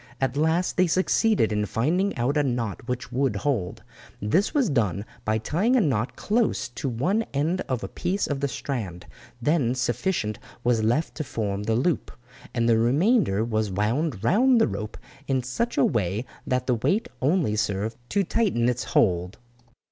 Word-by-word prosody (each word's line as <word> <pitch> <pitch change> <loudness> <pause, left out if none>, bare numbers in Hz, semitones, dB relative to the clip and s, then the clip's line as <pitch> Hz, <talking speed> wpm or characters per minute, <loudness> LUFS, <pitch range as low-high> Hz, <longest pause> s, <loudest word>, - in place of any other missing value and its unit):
At 135 -1 0
last 160 +4 +1
they 185 -1 +4
succeeded 185 - +2
in 105 0 0
finding 175 - 0
out 125 +5 0
a 150 - +4
knot 120 -6 -2
which 125 -1 -4
would 130 -3 +1
hold. 100 -5 -2 0.4
This 165 - +1
was 280 -6 +2
done 105 - 0 0.2
by 110 0 +2
tying 180 - +1
a - - +5
knot 130 - 0
close 225 - 0
to 135 +3 -4
one 150 - +1
end 160 +6 +1
of 130 -2 -1
a - - -3
piece 195 +3 -1
of 145 -2 -2
the 140 - 0
strand, 105 -12 -5 0.4
then 135 -4 +2
sufficient 120 - -1 0.2
was 120 -2 +2
left 120 +9 +1
to 155 - -2
form 105 -6 -3
the 110 +2 0
loop, 150 +8 0 0.4
and 115 -1 0
the 115 -1 +4
remainder 135 - +3
was 110 -2 0
wound 110 - -1
round 240 - +4
the 225 - +4
rope 105 0 -5 0.3
in 130 -2 +1
such 230 - -2
a 140 - +5
way 105 +1 0 0.2
that 125 0 0
the 125 - +2
weight 190 - +1
only 145 - +2
served 105 +1 -1
to 200 0 +2
tighten 180 - +1
its 125 -1 0
hold. 90 -2 +1
125 Hz, 175 wpm, -25 LUFS, 110-165 Hz, 0.4 s, a